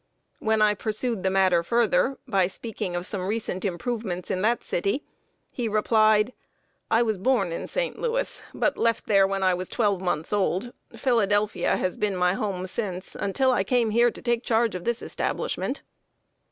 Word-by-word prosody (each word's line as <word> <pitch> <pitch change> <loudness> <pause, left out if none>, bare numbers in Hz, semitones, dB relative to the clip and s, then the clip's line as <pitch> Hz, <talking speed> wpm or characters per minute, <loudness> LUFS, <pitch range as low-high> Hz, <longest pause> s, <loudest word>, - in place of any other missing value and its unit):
When 220 -1 +2
I 210 0 +4
pursued 215 +1 -2
the 190 - +1
matter 185 -2 +3
further, 235 +7 +2
by 195 -6 +2
speaking 195 -2 -5
of 175 0 -3
some 185 -2 -3
recent 210 -3 -2
improvements 195 -1 -3
in 185 - -1
that 230 +4 +1
city, 200 +11 -1 0.5
he 240 -3 -2
replied: 215 +1 +3 0.6
"I 225 +1 +4
was 220 -4 -1
born 245 -4 +2
in 165 - -4
St. - - -2
Louis, - - -1
but - - 0
left 230 -1 +1
there 195 -2 +4
when 195 0 -2
I 185 -1 +4
was 180 +1 -4
twelve 205 -5 +1
months 175 -1 -2
old. 205 +3 0 0.2
Philadelphia 210 -5 +1
has 185 - -2
been 205 -2 0
my 180 0 +3
home 195 -3 -2
since, 185 -2 -4
until 260 +7 +1
I 245 - +2
came 235 +1 +1
here 235 +2 +4
to - - -11
take 240 -1 0
charge 230 0 +2
of 180 -1 -6
this 235 0 -1
establishment." - - -2
210 Hz, 175 wpm, -25 LUFS, 185-235 Hz, 0.6 s, I